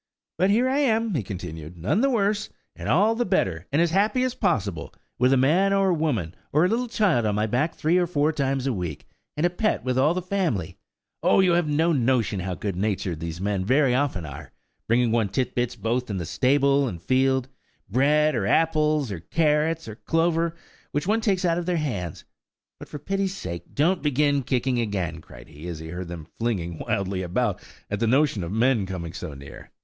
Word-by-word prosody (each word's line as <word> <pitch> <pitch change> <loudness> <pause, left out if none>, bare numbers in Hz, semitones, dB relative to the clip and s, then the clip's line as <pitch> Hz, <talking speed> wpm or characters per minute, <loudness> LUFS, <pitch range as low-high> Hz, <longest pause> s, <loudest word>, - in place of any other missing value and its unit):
"But 190 - +3
here 235 +5 +3
I 270 +2 +1
am," 225 -5 +1
he 145 - 0
continued, 90 -4 -7
"none 105 - 0
the 275 - +3
worse, 210 -3 0 0.3
and - - -5
all 205 +7 +4
the 240 +2 0
better, 90 - 0
and 145 - +2
as 170 -1 +3
happy 210 +7 +2
as 255 -1 0
possible, 100 - -1 0.2
with 125 +1 +4
a 135 - +4
man 175 +10 +3
or 195 -2 +3
woman, 130 - -1 0.2
or 155 +4 +4
a - - +4
little 240 +5 0
child 205 - +2
on 105 -2 0
my 105 +1 +1
back 130 +9 0
three 165 +4 +2
or 175 - +1
four 155 -2 +1
times 135 -3 -1
a 135 - +1
week, 85 -7 -5 0.3
and 155 - +1
a - - +4
pet 215 +4 0
with 130 0 0
all 150 +6 +3
the 185 - -1
family. 175 - -1 0.5
Oh! - - +4
you 185 -2 +4
have 170 -2 +2
no 160 +3 +2
notion 120 - +1
how 90 0 -3
good 100 0 -4
natured 95 -4 -2
these 85 0 -5
men 100 0 -1
very 130 +4 +3
often 130 - 0
are–bringing 110 - -3
one 115 -3 +1
tit 130 +5 -1
bits 120 0 -1
both 120 +2 -2
in 100 - -2
the 85 - -3
stable 140 - +2
and 90 -8 -5
field–bread, 130 - +1
or 110 -6 -1
apples, 155 -3 +2
or 95 - -4
carrots, 155 - +1
or 110 -1 -8
clover, 165 +2 0 0.4
which 145 - -1
one 220 +4 +1
takes 195 -4 +1
out 170 0 +2
of 175 - -5
their 180 -1 +1
hands. 100 - -4 0.5
But - - -10
for - - -6
pity's 195 +5 -2
sake 85 -1 -7
don't 170 +6 +2
begin 145 -1 +2
kicking 125 0 0
again," 95 -7 -2
cried - - -14
he, 80 +2 -10
as 85 -2 -5
he 80 +1 -8
heard 90 +1 -5
them 85 -2 -7
flinging 90 -8 -2
wildly 95 -1 -2
about, 95 +3 -1 0.3
at 105 - -1
the 115 - +1
notion 130 - +2
of 85 - -5
men 115 -2 +2
coming 85 -3 -5
so 85 -6 -6
near. 70 0 -11
130 Hz, 205 wpm, -25 LUFS, -, 0.5 s, all